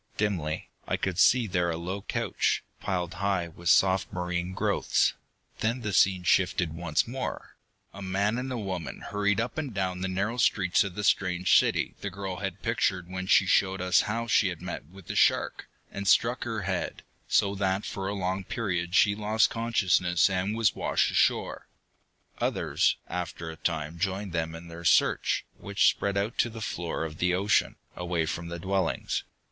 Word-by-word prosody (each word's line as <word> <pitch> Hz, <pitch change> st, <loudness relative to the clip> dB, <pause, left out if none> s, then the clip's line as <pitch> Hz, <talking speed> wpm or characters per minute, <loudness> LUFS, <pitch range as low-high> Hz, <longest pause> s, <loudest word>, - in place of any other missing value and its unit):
Dimly, 90 Hz, -8 st, -2 dB, 0.2 s
I -, -, 0 dB
could 95 Hz, -2 st, -2 dB
see 125 Hz, +3 st, +5 dB
there 90 Hz, -3 st, 0 dB
a 80 Hz, -, -2 dB
low 95 Hz, +4 st, -4 dB
couch, -, -, -1 dB, 0.2 s
piled 90 Hz, -3 st, -2 dB
high 95 Hz, -2 st, -1 dB
with 85 Hz, +1 st, -4 dB
soft 95 Hz, -1 st, +4 dB
marine 90 Hz, 0 st, -3 dB
growths. -, -, +1 dB, 0.5 s
Then 115 Hz, +3 st, 0 dB
the 105 Hz, -3 st, -3 dB
scene 95 Hz, 0 st, +4 dB
shifted 90 Hz, -2 st, +2 dB
once 85 Hz, +1 st, 0 dB
more. 130 Hz, +2 st, -5 dB, 0.4 s
A 100 Hz, -, -9 dB
man 100 Hz, +4 st, 0 dB
and 130 Hz, +1 st, -4 dB
a 125 Hz, -, -2 dB
woman 95 Hz, -6 st, -5 dB
hurried 105 Hz, +1 st, 0 dB
up 125 Hz, +6 st, -2 dB
and 145 Hz, -4 st, -4 dB
down 90 Hz, -2 st, -2 dB
the 95 Hz, -, -1 dB
narrow 100 Hz, +6 st, -1 dB
streets 95 Hz, -6 st, +3 dB
of 95 Hz, -3 st, -6 dB
the 105 Hz, -, -4 dB
strange 90 Hz, -2 st, +2 dB
city -, -, +3 dB
the 100 Hz, -, -3 dB
girl 95 Hz, -1 st, -5 dB
had 95 Hz, 0 st, -5 dB
pictured 95 Hz, -7 st, 0 dB
when 95 Hz, 0 st, -4 dB
she 95 Hz, -, +5 dB
showed 95 Hz, 0 st, +2 dB
us 90 Hz, 0 st, +3 dB
how 115 Hz, +2 st, -1 dB
she 115 Hz, -3 st, +3 dB
had 90 Hz, -3 st, -4 dB
met 90 Hz, -4 st, -6 dB
with 95 Hz, +2 st, -15 dB
the -, -, -5 dB
shark, -, -, +2 dB, 0.2 s
and 100 Hz, 0 st, -5 dB
struck -, -, +3 dB
her -, -, -3 dB
head, -, -, -3 dB, 0.2 s
so 100 Hz, -, +2 dB
that 95 Hz, 0 st, -1 dB
for 95 Hz, -1 st, -4 dB
a 100 Hz, -, -2 dB
long 95 Hz, 0 st, -2 dB
period 90 Hz, -4 st, -2 dB
she 100 Hz, 0 st, +5 dB
lost 110 Hz, +5 st, +2 dB
consciousness 95 Hz, -6 st, +2 dB
and 95 Hz, +3 st, -1 dB
was 115 Hz, -3 st, +3 dB
washed -, -, +1 dB
ashore. -, -, +1 dB, 0.7 s
Others, -, -, +1 dB
after 85 Hz, -2 st, -5 dB
a -, -, -9 dB
time, 80 Hz, -1 st, -3 dB
joined 95 Hz, 0 st, -2 dB
them 80 Hz, -1 st, -2 dB
in 85 Hz, +1 st, -10 dB
their 85 Hz, 0 st, -9 dB
search, 80 Hz, -, +3 dB
which 100 Hz, 0 st, +2 dB
spread 100 Hz, 0 st, -1 dB
out 100 Hz, +4 st, -2 dB
to 120 Hz, -, +3 dB
the 115 Hz, 0 st, -9 dB
floor 85 Hz, -6 st, -3 dB
of 80 Hz, -1 st, -6 dB
the 90 Hz, 0 st, +2 dB
ocean, 100 Hz, +3 st, +2 dB, 0.2 s
away 85 Hz, -2 st, -1 dB
from 85 Hz, +2 st, -4 dB
the 85 Hz, 0 st, -5 dB
dwellings. 95 Hz, +2 st, -1 dB
95 Hz, 185 wpm, -28 LUFS, 90-100 Hz, 0.7 s, see